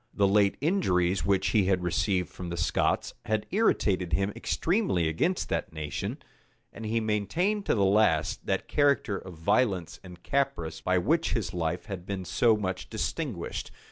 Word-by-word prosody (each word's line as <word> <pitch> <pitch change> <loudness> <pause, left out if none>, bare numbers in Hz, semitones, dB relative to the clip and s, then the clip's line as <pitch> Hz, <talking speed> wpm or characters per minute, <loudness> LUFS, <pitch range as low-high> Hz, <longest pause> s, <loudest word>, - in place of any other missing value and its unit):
The 100 -1 +3
late 100 0 +3
injuries 95 - +1
which 95 -1 +2
he 105 -4 +3
had 90 -1 +1
received 90 +1 0
from 90 -2 -7
the 85 - -4
Scots, - - 0
had 110 -1 0
irritated 95 - +1
him 100 +1 +1
extremely 165 - 0
against 165 - 0
that - - -2
nation; 75 -4 -4 0.6
and 115 - -6
he 115 +2 +1
maintained 165 - 0
to - - +3
the 100 -3 +3
last 95 -5 +2
that - - -1
character 140 -8 +2
of 95 -2 -10
violence 90 +1 0
and 90 -1 -12
caprice 135 - -1
by 90 0 +1
which 160 - +1
his 100 -6 -2
life 85 +1 -2
had 95 -4 -7
been 95 -2 -4
so 115 +4 +3
much 95 -3 -4
distinguished. - - -3
100 Hz, 165 wpm, -28 LUFS, 90-115 Hz, 0.6 s, The